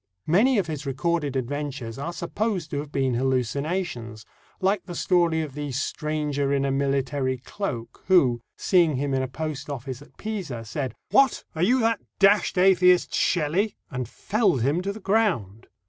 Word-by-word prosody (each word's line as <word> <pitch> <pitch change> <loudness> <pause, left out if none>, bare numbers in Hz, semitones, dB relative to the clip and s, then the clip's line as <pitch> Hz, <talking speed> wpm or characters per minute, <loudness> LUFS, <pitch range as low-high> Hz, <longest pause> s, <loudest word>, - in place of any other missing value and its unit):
Many 220 +11 +4
of 200 - +2
his 150 -3 -5
recorded 145 +1 -1
adventures 135 -2 -3
are 165 +5 -3
supposed 180 0 -2
to 140 - -1
have 145 0 -6
been 135 -3 +1
hallucinations, 130 - -2 0.3
like 190 0 +1
the 175 - -7
story 165 -2 +2
of 150 -4 -7
the 145 0 -4
"stranger 145 +1 -1
in 140 -1 +1
a 135 - 0
military 135 -1 0
cloak," 120 - -5
who, 130 -11 +4 0.2
seeing 170 -6 +3
him 140 +1 -1
in 135 - +1
a 130 - -1
post 150 +2 -5
office 130 -1 -5
at 145 - -17
Pisa, 180 - -5
said, 130 +4 -4 0.2
"What! 275 -1 +4
Are 160 - -4
you 245 +9 +4
that 225 -1 +2 0.2
d 195 - +7 0.3
d 180 - +3
atheist, 180 -1 +5
Shelley?" 175 +6 +1 0.2
and 125 -2 -4
felled 195 - +1
him 145 +7 +1
to 195 +2 -2
the 210 - -8
ground. 185 - 0
150 Hz, 170 wpm, -25 LUFS, 130-180 Hz, 0.3 s, d